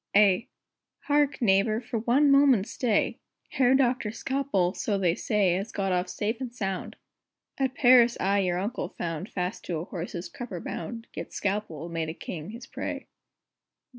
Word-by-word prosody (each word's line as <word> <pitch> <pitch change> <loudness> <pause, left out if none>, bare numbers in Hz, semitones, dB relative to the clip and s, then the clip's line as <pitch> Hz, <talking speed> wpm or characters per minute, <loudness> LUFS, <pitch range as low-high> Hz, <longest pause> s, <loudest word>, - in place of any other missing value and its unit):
A. 205 +2 +5 0.5
Hark, 290 -2 +1
neighbor, 205 +1 +3
for 235 -1 -4
one 265 +6 +4
moment 275 -7 +5
stay! 230 -3 0 0.3
Herr 255 0 +3
Doctor 250 -4 +2
Scalpel, 225 -7 0
so 205 -1 -1
they 180 -4 +2
say, 200 -1 +1
Has 195 +5 -3
got 195 -1 -1
off 180 0 0
safe 220 +6 -2
and 250 -2 -4
sound; 195 -6 -4 0.6
At 265 -1 0
Paris 245 -3 +6
I 200 +1 +2
your 180 -2 +1
uncle 210 +7 -3
found 165 +3 -4
Fast 180 +3 -3
to 170 - -2
a 160 - -4
horse's 175 -1 -5
crupper 230 -8 -7
bound, 230 +8 -6
Yet - - -7
Scalpel 195 -6 -2
made 165 -2 -3
a 160 - -5
king 160 -1 -7
his 230 +3 -9
prey. - - -5
210 Hz, 165 wpm, -27 LUFS, 180-245 Hz, 0.6 s, Paris